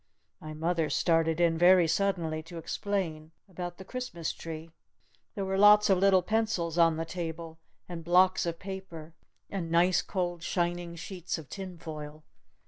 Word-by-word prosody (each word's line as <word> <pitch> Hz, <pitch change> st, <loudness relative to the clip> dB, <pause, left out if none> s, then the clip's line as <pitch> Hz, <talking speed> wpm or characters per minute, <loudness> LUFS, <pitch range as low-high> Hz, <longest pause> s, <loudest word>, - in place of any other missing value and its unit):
My 155 Hz, 0 st, -8 dB
mother 165 Hz, 0 st, 0 dB
started 165 Hz, +1 st, +2 dB
in 165 Hz, -2 st, +2 dB
very 175 Hz, -1 st, +6 dB
suddenly 165 Hz, -4 st, 0 dB
to 175 Hz, -, -8 dB
explain 165 Hz, -3 st, -3 dB
about 175 Hz, -2 st, -6 dB
the 190 Hz, -, -10 dB
Christmas 245 Hz, -9 st, -4 dB
tree. 160 Hz, 0 st, -8 dB, 0.6 s
There 200 Hz, -2 st, -2 dB
were 190 Hz, 0 st, -1 dB
lots 210 Hz, 0 st, +7 dB
of 190 Hz, -, +4 dB
little 190 Hz, -1 st, +4 dB
pencils 215 Hz, -7 st, 0 dB
on 165 Hz, -2 st, +4 dB
the 165 Hz, -, -2 dB
table. 165 Hz, -1 st, -6 dB, 0.3 s
And 170 Hz, -2 st, -7 dB
blocks 185 Hz, +2 st, +4 dB
of 170 Hz, 0 st, -2 dB
paper. 185 Hz, -5 st, -8 dB, 0.4 s
And 180 Hz, -5 st, -3 dB
nice 175 Hz, +2 st, +3 dB
cold, 175 Hz, -3 st, -3 dB
shining 175 Hz, -1 st, -2 dB
sheets 175 Hz, +1 st, -5 dB
of 160 Hz, -4 st, -11 dB
tin 190 Hz, -3 st, -7 dB
foil. 155 Hz, -1 st, -8 dB
175 Hz, 155 wpm, -29 LUFS, 165-190 Hz, 0.6 s, lots